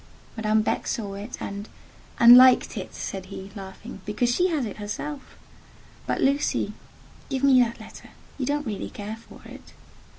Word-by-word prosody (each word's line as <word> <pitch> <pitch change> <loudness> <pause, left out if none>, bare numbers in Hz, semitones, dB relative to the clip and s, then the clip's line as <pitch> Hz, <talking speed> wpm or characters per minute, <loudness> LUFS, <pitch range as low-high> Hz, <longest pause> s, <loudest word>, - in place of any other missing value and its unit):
Madame 215 -1 +1
Beck - - -1
saw 205 -4 -3
it, 205 +4 -7
and—" 200 +1 -6 0.5
"And 235 +1 +10
liked 255 0 +6
it," - - -6
said 190 -1 -5
he, 195 0 -9
laughing, 195 +2 -9
"because 240 +4 0
she 360 +8 +2
has 310 -8 -1
it 210 - -7
herself. 240 +8 -6 0.7
But, - - -1
Lucy, 280 +2 +1 0.6
give 270 -1 -2
me 265 -2 +6
that 235 -1 -1
letter—you 260 -3 -10
don't 290 +1 -1
really 215 -4 -4
care 210 +2 -7
for 230 - -16
it." - - -13
230 Hz, 160 wpm, -25 LUFS, 205-265 Hz, 0.7 s, And